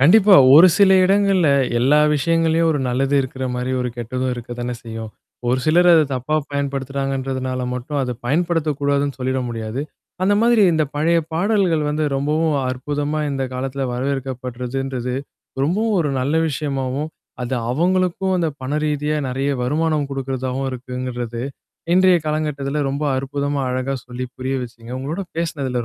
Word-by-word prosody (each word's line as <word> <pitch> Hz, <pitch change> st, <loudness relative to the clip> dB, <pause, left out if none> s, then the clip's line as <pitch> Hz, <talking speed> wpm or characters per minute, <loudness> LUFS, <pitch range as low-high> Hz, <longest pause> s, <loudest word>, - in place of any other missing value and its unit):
கண்டிப்பா. 195 Hz, +7 st, +7 dB, 0.2 s
ஒரு 165 Hz, +5 st, +10 dB
சில 200 Hz, -2 st, +5 dB
இடங்கள்ல, 195 Hz, -3 st, +3 dB, 0.3 s
எல்லா 140 Hz, +5 st, +4 dB, 0.2 s
விஷயங்கள்லயும் 165 Hz, +1 st, +2 dB
ஒரு 145 Hz, -, -1 dB
நல்லது 135 Hz, +3 st, 0 dB
இருக்கிற 130 Hz, 0 st, -5 dB
மாரி 125 Hz, +1 st, -2 dB
ஒரு 125 Hz, -, -1 dB
கெட்டதும் 125 Hz, +2 st, -2 dB
இருக்க 120 Hz, 0 st, -9 dB
தானே 120 Hz, 0 st, -3 dB
செய்யும்! 110 Hz, -1 st, -7 dB, 0.4 s
ஒரு 125 Hz, -, +2 dB
சிலர் 175 Hz, +3 st, +4 dB
அத 160 Hz, -2 st, +6 dB
தப்பா 130 Hz, +4 st, -2 dB, 0.2 s
பயன்படுத்துறாங்கன்றதுனால 135 Hz, -2 st, -2 dB
மட்டும் 140 Hz, +4 st, -4 dB
அத 125 Hz, -1 st, -2 dB
பயன்படுத்தக்கூடாதுன்னு 145 Hz, -2 st, 0 dB
சொல்லிட 130 Hz, +1 st, -1 dB
முடியாது. 115 Hz, +2 st, -4 dB, 0.4 s
அந்த 200 Hz, +2 st, +3 dB
மாதிரி 235 Hz, -2 st, +4 dB
இந்த 155 Hz, -1 st, +2 dB
பழைய 165 Hz, +3 st, +2 dB
பாடல்கள் 180 Hz, -3 st, +1 dB
வந்து, 150 Hz, +1 st, 0 dB
ரொம்பவும் 150 Hz, +2 st, +1 dB
அற்புதமா 145 Hz, +3 st, -2 dB
இந்த 135 Hz, -1 st, -2 dB
காலத்தில 135 Hz, +1 st, -3 dB
வரவேற்கப்படுறதுன்றது, 130 Hz, -1 st, -3 dB, 0.5 s
ரொம்பவும் 205 Hz, +7 st, +1 dB
ஒரு 150 Hz, -4 st, 0 dB
நல்ல 140 Hz, +5 st, 0 dB
விஷயமாவும், 140 Hz, -1 st, -2 dB, 0.3 s
அது 125 Hz, +2 st, -2 dB, 0.2 s
அவங்களுக்கும், 185 Hz, +5 st, +1 dB
அந்த 165 Hz, -2 st, 0 dB
பண 130 Hz, -, -4 dB
ரீதியா 150 Hz, 0 st, -1 dB
நிறையா 135 Hz, +2 st, -1 dB
வருமானம் 150 Hz, +2 st, 0 dB
குடுக்குறதாவும் 130 Hz, 0 st, -3 dB
இருக்குங்கறது, 125 Hz, -2 st, -5 dB, 0.5 s
இன்றைய 185 Hz, 0 st, +5 dB
காலங்கட்டத்தில 150 Hz, -2 st, -2 dB
ரொம்ப 140 Hz, +2 st, -2 dB
அற்புதமா, 140 Hz, +1 st, -2 dB
அழகா 130 Hz, +2 st, -2 dB
சொல்லி 125 Hz, +1 st, -5 dB
புரிய 130 Hz, +1 st, -2 dB
வச்சீங்க. 115 Hz, 0 st, -11 dB
உங்களோட 155 Hz, +9 st, -3 dB
பேசினதில 140 Hz, -7 st, -2 dB
140 Hz, 135 wpm, -20 LUFS, 130-160 Hz, 0.5 s, ஒரு